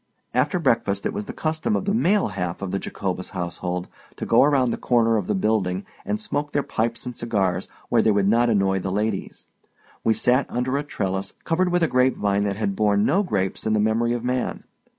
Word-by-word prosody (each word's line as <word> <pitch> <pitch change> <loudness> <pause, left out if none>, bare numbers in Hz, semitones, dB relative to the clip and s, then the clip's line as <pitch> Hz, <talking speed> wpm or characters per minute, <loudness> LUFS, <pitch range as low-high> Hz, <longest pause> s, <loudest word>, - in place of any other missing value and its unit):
After 135 +8 +2
breakfast, 115 - +1
it - - -1
was 105 - -4
the - - -4
custom 160 +7 -1
of - - -1
the 200 - +1
male 205 - +2
half 90 -1 -4
of 95 - -3
the 100 - -1
Jacobus 95 -2 -4
household 90 0 -3 0.3
to - - -5
go - - +5
around 135 -4 +3
the - - -2
corner 115 -2 +2
of 105 -4 -1
the 105 - +1
building 95 -2 0 0.2
and 210 - -1
smoke 150 -9 -3
their 145 - +1
pipes 115 +2 -2
and 125 -1 -5
cigars 95 -6 -1 0.2
where 115 - +4
they 110 - +3
would 100 -2 +3
not 120 +3 +4
annoy 95 -3 +2
the 95 0 -3
ladies. 105 0 -2 0.6
We 110 - +3
sat 125 +2 +2
under 125 +2 -1
a 145 - 0
trellis 95 -9 -3
covered 180 +2 +1
with 175 -1 +2
a - - +4
grapevine 105 -7 +2
that 100 -1 -1
had 100 -2 -1
borne 105 0 +2
no 195 - +3
grapes 100 - -2
in 110 - +2
the 105 - +2
memory 110 +3 +2
of 120 -1 -3
man. 125 0 -2
110 Hz, 215 wpm, -23 LUFS, 100-130 Hz, 0.6 s, go